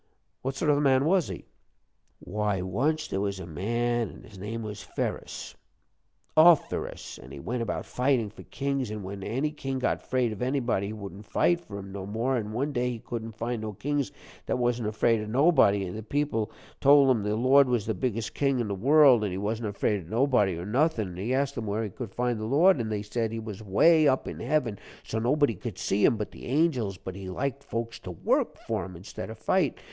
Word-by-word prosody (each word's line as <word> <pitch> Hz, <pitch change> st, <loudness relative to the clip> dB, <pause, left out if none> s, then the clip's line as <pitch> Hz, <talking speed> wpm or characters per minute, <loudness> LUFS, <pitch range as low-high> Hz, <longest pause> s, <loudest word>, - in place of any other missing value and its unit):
What 135 Hz, +1 st, -3 dB
sort 150 Hz, +2 st, +2 dB
of 145 Hz, -, +3 dB
a -, -, +1 dB
man 135 Hz, -1 st, +4 dB
was 180 Hz, 0 st, +3 dB
he?" -, -, -7 dB, 0.7 s
"Why, 105 Hz, +1 st, -2 dB
once 150 Hz, -, 0 dB
there 95 Hz, -, -2 dB
was 100 Hz, -1 st, -2 dB
a 95 Hz, -, -6 dB
man, 115 Hz, +7 st, -1 dB
an' -, -, -13 dB
his 100 Hz, -3 st, -13 dB
name 110 Hz, +4 st, -4 dB
was 105 Hz, -2 st, -6 dB
Ferus -, -, -4 dB, 0.8 s
_Of_ferus, 160 Hz, -, +3 dB
an' 65 Hz, -, -12 dB
he 70 Hz, -, -8 dB
went 120 Hz, -, -3 dB
about 115 Hz, -, -3 dB
fightin' 125 Hz, -5 st, +1 dB
for -, -, -12 dB
kings, 140 Hz, -3 st, -2 dB
but 105 Hz, 0 st, -5 dB
when 100 Hz, +1 st, -6 dB
any 135 Hz, +9 st, -1 dB
king 135 Hz, -3 st, -4 dB
got 130 Hz, -, +1 dB
afraid 125 Hz, -3 st, 0 dB
of 105 Hz, -, -7 dB
anybody, 125 Hz, -6 st, 0 dB
he 105 Hz, -, -5 dB
wouldn't 100 Hz, -1 st, -9 dB
fight 175 Hz, 0 st, +2 dB
for 100 Hz, -10 st, -9 dB
him 100 Hz, -1 st, -8 dB
no 95 Hz, -1 st, -6 dB
more. 115 Hz, +6 st, 0 dB
An' 105 Hz, -3 st, -2 dB
one 135 Hz, +7 st, -1 dB
day 125 Hz, -1 st, 0 dB
he 120 Hz, -, -3 dB
couldn't 115 Hz, -1 st, -6 dB
find 115 Hz, 0 st, -2 dB
no 110 Hz, -1 st, -4 dB
kings 145 Hz, +5 st, -2 dB, 0.4 s
that -, -, 0 dB
wasn't 120 Hz, -2 st, 0 dB
afraid 110 Hz, +1 st, +2 dB
of 105 Hz, -, -5 dB
nobody. 120 Hz, -, +4 dB
An' 90 Hz, -, -5 dB
the 110 Hz, -, -5 dB
people 115 Hz, -2 st, -1 dB, 0.3 s
told 140 Hz, -1 st, +6 dB
him 115 Hz, -4 st, +2 dB
the 105 Hz, +1 st, -1 dB
Lord 130 Hz, +3 st, +5 dB
was 120 Hz, -4 st, +1 dB
the 110 Hz, -, 0 dB
biggest 110 Hz, +2 st, -2 dB
king 135 Hz, -2 st, +1 dB
in 115 Hz, -3 st, -1 dB
the -, -, -1 dB
world, 130 Hz, +2 st, +6 dB
an' 105 Hz, -, 0 dB
he 90 Hz, -, -4 dB
wasn't 110 Hz, +2 st, -2 dB
afraid 100 Hz, 0 st, 0 dB
of 80 Hz, -, -14 dB
nobody 115 Hz, -6 st, +2 dB
or 85 Hz, -, -5 dB
nothing. 120 Hz, -, +1 dB
An' 90 Hz, -, -9 dB
he 105 Hz, +7 st, -2 dB
asked 140 Hz, +1 st, +1 dB
'em 110 Hz, -, -5 dB
where 105 Hz, +2 st, -1 dB
he 105 Hz, -, -4 dB
could 115 Hz, 0 st, -7 dB
find 120 Hz, -2 st, 0 dB
the 110 Hz, -, -3 dB
Lord, 155 Hz, +7 st, +5 dB
an' 110 Hz, -2 st, -2 dB
they 105 Hz, -1 st, -2 dB
said 110 Hz, +1 st, -2 dB
he 115 Hz, -, -4 dB
was 110 Hz, -2 st, -7 dB
way 155 Hz, -, +5 dB
up 130 Hz, -1 st, +2 dB
in -, -, -6 dB
heaven 120 Hz, -5 st, 0 dB, 0.2 s
so 110 Hz, -, -3 dB
nobody 140 Hz, +2 st, +2 dB
couldn't 100 Hz, 0 st, -7 dB
see 100 Hz, +1 st, 0 dB
him 115 Hz, -, +5 dB
but 105 Hz, -, -4 dB
the -, -, -10 dB
angels, 130 Hz, -, +1 dB
but 95 Hz, 0 st, -7 dB
he 95 Hz, -1 st, -7 dB
liked 140 Hz, +7 st, -3 dB
folks 115 Hz, 0 st, -4 dB
to -, -, -9 dB
work 85 Hz, -, 0 dB
for -, -, -3 dB
him 90 Hz, -, -8 dB
instead 90 Hz, +6 st, -8 dB
of 110 Hz, -, -8 dB
fight. 150 Hz, +5 st, +1 dB
115 Hz, 230 wpm, -28 LUFS, 105-135 Hz, 0.8 s, told